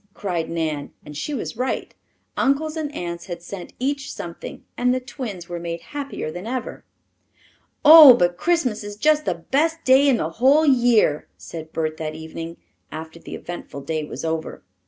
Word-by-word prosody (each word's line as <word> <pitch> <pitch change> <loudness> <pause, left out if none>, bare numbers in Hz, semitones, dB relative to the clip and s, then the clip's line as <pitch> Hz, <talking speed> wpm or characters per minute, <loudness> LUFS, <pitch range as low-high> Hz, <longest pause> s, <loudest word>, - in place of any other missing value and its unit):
cried 175 -5 -3
Nan, 155 -4 -3
and 150 - -10
she 225 - -4
was 275 - -4
right. 255 +1 -2 0.4
Uncles 305 +3 +1
and 310 -2 -3
aunts 170 0 -5
had 170 -2 -6
sent 180 0 -8
each 275 +2 -2
something; 170 -1 -8
and 250 0 +2
the 255 - +1
twins 235 -9 -7
were 175 -1 -5
made 170 0 -5
happier 280 - -4
than 180 +6 -7
ever. 255 +1 -4 1.0
"Oh, 300 -4 +11
but 175 -5 +2
Christmas 270 - 0
is 205 0 -7
just 305 +6 +2
the - - 0
best 320 - 0
day 265 +2 +5
in 255 - +4
the 160 -4 -2
whole 290 +5 +5
year," 240 - +3
said 160 -1 -9
Bert 155 -1 -2
that 155 -1 -4
evening, 165 +1 -7 0.3
after 160 +1 -8
the - - -8
eventful 175 -5 -8
day 155 +2 -3
was 150 - -6
over. 160 0 -3
200 Hz, 175 wpm, -22 LUFS, 165-275 Hz, 1.0 s, Oh